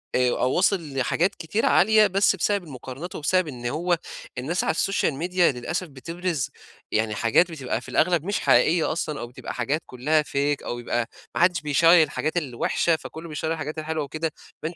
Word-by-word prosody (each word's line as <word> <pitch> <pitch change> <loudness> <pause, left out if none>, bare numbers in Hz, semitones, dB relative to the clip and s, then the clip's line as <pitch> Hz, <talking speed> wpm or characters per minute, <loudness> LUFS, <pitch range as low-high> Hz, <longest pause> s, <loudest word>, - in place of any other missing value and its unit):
آآ 125 0 +3
أو 125 +1 0
واصل 175 -6 +1
لحاجات 175 +9 +1
كتيرة 205 +8 -1
عالية، 215 +2 +5
بس 195 +1 +3
بسبب 200 +1 0
المقارنات 140 +2 -8
وبسبب 185 +3 +1
إن 125 -4 -8
هو 170 +7 0 0.4
الناس 160 +8 -1
على - - +1
الSocial 190 -4 +1 0.2
Media 180 - -4
للأسف 170 +4 +1
بتبرِز 165 +2 -3 0.4
يعني 110 -1 0
حاجات 145 +12 +3
بتبقى- 135 -6 -3
في - - -11
الأغلب- 170 -2 +2
مش 200 0 0
حقيقية 165 0 +3
أصلًا 155 -2 -3
أو 120 - -5
بتبقى 120 - -8
حاجات 140 +6 -1
كلها 150 +5 +1
Fake 145 0 -1
أو 120 - -4
يبقى 120 -1 -2 0.3
ما - - 0
حدّش 175 -2 +3
بيشيّر 165 +3 +5
الحاجات 155 +2 -2
الوحشة، 150 +3 +1
فكله 160 +1 -9
بيشيّر 160 +1 -3
الحاجات 155 -1 -5
الحلوة 155 0 -2
وكده، 155 +3 -3 0.3
فأنتِ 165 +2 -3
160 Hz, 180 wpm, -24 LUFS, 135-175 Hz, 0.4 s, عالية